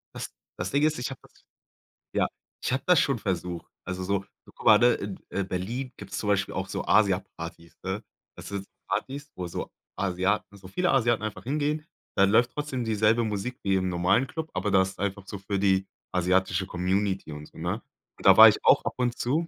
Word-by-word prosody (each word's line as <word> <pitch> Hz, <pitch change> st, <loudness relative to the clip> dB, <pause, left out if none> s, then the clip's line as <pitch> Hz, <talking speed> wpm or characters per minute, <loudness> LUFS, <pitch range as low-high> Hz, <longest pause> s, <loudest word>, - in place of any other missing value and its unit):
Das -, -, -5 dB, 0.3 s
das 90 Hz, +2 st, -3 dB
Ding 145 Hz, +1 st, +2 dB
ist, 155 Hz, -3 st, +2 dB
ich 125 Hz, -, -2 dB
habe 135 Hz, -, -8 dB
das -, -, -22 dB, 0.7 s
ja, -, -, +2 dB, 0.4 s
ich -, -, 0 dB
habe 130 Hz, -, -1 dB
das 180 Hz, -1 st, +6 dB
schon 135 Hz, -5 st, +1 dB
versucht. 90 Hz, -3 st, -3 dB
Also, 95 Hz, 0 st, -4 dB
so 100 Hz, 0 st, -1 dB, 0.3 s
guck -, -, -13 dB
mal, 105 Hz, -1 st, +8 dB
ne, 120 Hz, 0 st, +6 dB, 0.4 s
in 100 Hz, -1 st, -2 dB
Berlin 115 Hz, +9 st, -3 dB
gibt's 100 Hz, -1 st, -7 dB
zum 105 Hz, -, -3 dB
Beispiel 100 Hz, -1 st, +1 dB
auch 95 Hz, 0 st, -3 dB
so -, -, -4 dB
Asiapartys, 90 Hz, -5 st, 0 dB
ne? 95 Hz, +3 st, -3 dB, 0.3 s
Das -, -, -9 dB
sind 100 Hz, -1 st, -4 dB, 0.2 s
Partys, 145 Hz, +2 st, -3 dB
wo 90 Hz, -1 st, -4 dB
so 85 Hz, -, -5 dB, 0.3 s
Asiaten 100 Hz, +2 st, -1 dB
so 95 Hz, -1 st, -12 dB
viele 180 Hz, -, +1 dB
Asiaten 120 Hz, -4 st, +2 dB
einfach 110 Hz, -, -4 dB
hingehen, 150 Hz, +3 st, -1 dB, 0.3 s
dann 100 Hz, 0 st, +5 dB
läuft 120 Hz, +2 st, +4 dB
trotzdem 145 Hz, -4 st, -3 dB
dieselbe 110 Hz, +1 st, +3 dB
Musik 110 Hz, +4 st, -3 dB
wie 95 Hz, -1 st, +2 dB
im 95 Hz, -1 st, +1 dB
normalen 90 Hz, +9 st, +2 dB
Club, 160 Hz, 0 st, -5 dB
aber 105 Hz, -, -1 dB
das 95 Hz, 0 st, +4 dB
ist -, -, -18 dB
einfach 100 Hz, 0 st, -2 dB
so 100 Hz, -, -5 dB
für 100 Hz, 0 st, -3 dB
die 95 Hz, -1 st, +2 dB, 0.2 s
asiatische 95 Hz, +1 st, +1 dB
Community 95 Hz, -1 st, -1 dB
und 75 Hz, 0 st, -7 dB
so, -, -, -19 dB
ne? -, -, -2 dB, 0.4 s
Und -, -, -13 dB
da -, -, +9 dB
war -, -, +12 dB
ich -, -, +1 dB
auch -, -, +6 dB
ab -, -, -1 dB
und 125 Hz, -1 st, 0 dB
zu. 155 Hz, +7 st, 0 dB
100 Hz, 205 wpm, -27 LUFS, 95-125 Hz, 0.7 s, war